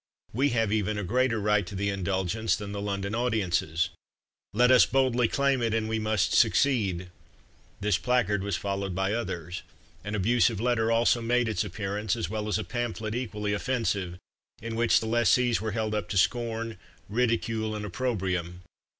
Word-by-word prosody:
We 135 +6 +2
have 115 -4 +1
even 105 -1 0
a 105 - -2
greater 125 +3 +1
right 105 0 +2
to 100 - -7
the 100 +1 -1
indulgence 95 +3 0
than 105 -2 -6
the 100 0 -4
London 100 0 -3
audiences 95 -8 0 0.6
LET 125 +4 +4
US 130 - +7
BOLDLY 125 -3 +2
CLAIM 140 +1 +1
IT 115 -1 +1
AND 110 -1 0
WE 110 0 -1
MUST 110 -2 +1
SUCCEED!! 95 -10 +2 0.7
This 100 -3 +1
placard 105 -3 +1
was 100 -1 -2
followed 100 0 -3
by 95 +2 0
others. 90 -6 -4 0.4
An 105 +1 -3
abusive 115 +1 +2
letter 115 -1 +1
also 115 +1 +3
made 120 +1 +1
its 110 - 0
appearance, 100 +1 -2
as 85 - -3
well 110 -1 -3
as 105 - +1
a 110 - -3
pamphlet 115 -3 -3
equally 105 -4 -2
offensive, 100 -6 -1 0.4
in 115 0 -5
which 115 0 +3
the - - -4
lessees 120 +1 +3
were 110 -2 -3
held 110 -1 -1
up 105 -1 -2
to 100 - -1
scorn, 115 0 0 0.3
ridicule, 115 -1 0
and 105 -1 -4
opprobrium. 90 -5 -2
110 Hz, 170 wpm, -27 LUFS, 100-120 Hz, 0.7 s, US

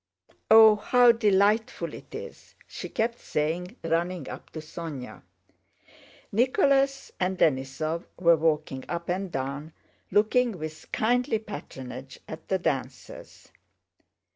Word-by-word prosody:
"Oh, 220 -1 +8
how 245 +3 +5
delightful 210 -1 +2
it - - -11
is!" - - -10
she - - -8
kept 235 +1 -1
saying, 170 +7 -2
running 165 0 -1
up - - -9
to 160 - -5
Sónya. 155 -4 -7 1.1
Nicholas 275 - +2
and 185 0 0
Denísov 155 +4 0
were 170 -1 +5
walking 150 -4 0
up 170 0 -4
and 185 +1 -2
down, 140 +3 -4 0.4
looking 215 +2 +2
with 155 0 -8
kindly 245 +1 +1
patronage 135 - -9
at 160 - -9
the 190 - +1
dancers. 135 -6 -5
175 Hz, 115 wpm, -27 LUFS, 155-220 Hz, 1.1 s, Oh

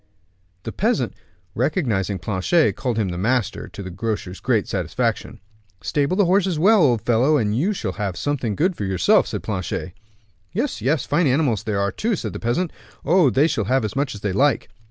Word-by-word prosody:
The - - -5
peasant, - - 0 0.4
recognizing 115 - 0
Planchet, 110 - +1
called 125 -4 -2
him 105 -4 0
"the 85 0 -4
master," 115 +2 0
to 100 - -9
the 95 - -7
grocer's 95 -1 -4
great - - +1
satisfaction. - - -2 0.4
"Stable 140 - 0
the 205 - +4
horses 185 -1 +2
well, 205 +5 +5
old 120 -7 +3
fellow, 125 +6 +3
and 105 -4 0
you 165 - +1
shall 110 - -3
have 95 -1 -4
something 130 -7 -2
good 180 - +1
for 105 - -5
yourself," 95 -3 +3
said - - -5
Planchet. 95 -3 -3 0.6
"Yes, 245 +8 -2
yes; 140 +1 +1
fine 150 +2 +2
animals 130 -5 +1
they 110 -1 -3
are 100 0 0
too," 225 - -1
said - - -5
the - - -5
peasant. 125 +9 -1 0.3
"Oh! 170 -1 +4
they 135 +4 +3
shall 110 -10 0
have 130 +2 +1
as 105 - -5
much 135 -4 -1
as 100 - -9
they 100 -2 -1
like." 140 +5 +2
125 Hz, 195 wpm, -22 LUFS, 100-155 Hz, 0.6 s, well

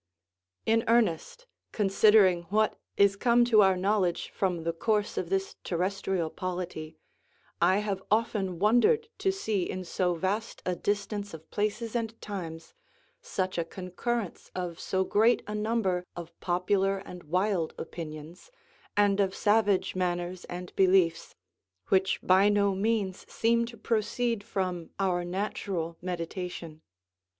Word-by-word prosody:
In 225 0 +3
earnest, 230 - +1 0.3
considering 195 -3 +4
what 215 +2 +2 0.2
is 200 0 +5
come 240 +3 +4
to 225 -3 +6
our 190 -2 +4
knowledge 185 -2 0
from 180 -4 -1
the 165 0 -1
course 210 +4 0
of 170 - -3
this 195 0 -1
terrestrial 185 -1 -1
polity, 175 -4 -5 0.6
I 185 +3 +5
have 195 -2 -2
often 210 -4 0
wondered 245 - +3
to 385 - +2
see 220 - -1
in 185 - -4
so 180 0 0
vast 200 +6 -2
a 180 - 0
distance 205 -1 -2
of 160 0 -15
places 215 +2 -2
and 225 -1 -2
times 165 -5 -7 0.5
such 185 - -2
a - - +1
concurrence 185 +5 -4
of 175 -2 -4
so 190 0 0
great 220 +5 +3
a 210 - -5
number 210 -4 0
of 170 -1 -8
popular 190 +2 +1
and 180 -2 -9
wild 180 +1 0
opinions, 160 - -8 0.5
and 205 -1 +4
of 195 -1 +1
savage 205 -3 +2
manners 175 0 -2
and 180 0 -7
beliefs, 185 -3 +3 0.5
which 190 0 +2
by 190 +2 +5
no 200 -1 +3
means 200 -1 -1
seem 235 +1 +2
to 235 0 -10
proceed 225 +1 -1
from 180 -4 -3
our 180 -2 +1
natural 180 -2 -3
meditation. 175 -2 -5
190 Hz, 135 wpm, -29 LUFS, 180-210 Hz, 0.6 s, to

